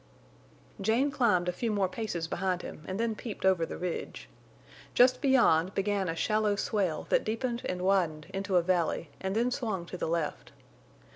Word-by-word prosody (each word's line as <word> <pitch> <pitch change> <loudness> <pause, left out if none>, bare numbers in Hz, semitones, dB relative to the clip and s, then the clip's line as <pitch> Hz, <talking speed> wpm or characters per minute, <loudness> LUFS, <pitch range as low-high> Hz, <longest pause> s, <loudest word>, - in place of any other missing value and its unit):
Jane 230 +8 +2
climbed 210 -10 +2
a - - +2
few 225 +5 -2
more 200 -2 +1
paces 180 -5 -3
behind 185 0 -1
him 150 - -8
and 190 +2 -3
then 230 -1 +1
peeped 215 -2 -6
over 180 -4 +3
the - - -6
ridge. 180 -1 -5 0.7
Just 250 +1 +5
beyond 215 - +4
began 195 -2 0
a 165 - -2
shallow 215 +3 +1
swale 195 -6 -1
that - - +3
deepened 235 +2 -2
and 180 0 -3
widened 175 -6 +1
into 195 0 -2
a 175 - +3
valley 170 -3 0
and 190 +1 -2
then 240 +3 +2
swung 220 -9 -2
to 180 - -7
the - - -2
left. 165 -2 -2
195 Hz, 180 wpm, -30 LUFS, 175-225 Hz, 0.7 s, Just